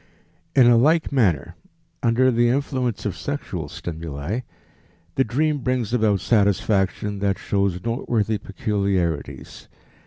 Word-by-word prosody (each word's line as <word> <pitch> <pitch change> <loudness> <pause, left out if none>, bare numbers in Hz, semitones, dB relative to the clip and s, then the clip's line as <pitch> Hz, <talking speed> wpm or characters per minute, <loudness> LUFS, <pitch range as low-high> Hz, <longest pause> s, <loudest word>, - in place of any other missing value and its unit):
In 130 -3 +7
a 120 -1 +6
like 155 +7 +3
manner, 105 - +1 0.5
under 125 +3 +3
the 120 0 +3
influence 130 -3 -1
of - - -2
sexual - - -4
stimuli, 80 - -5 0.7
the 135 - +2
dream 145 +5 0
brings 125 -3 -1
about 110 -5 +2
satisfaction 100 -1 +1
that 100 -1 0
shows 100 -3 -1
noteworthy 115 -3 -1
peculiarities. 100 -5 -2
110 Hz, 115 wpm, -23 LUFS, 100-125 Hz, 0.7 s, In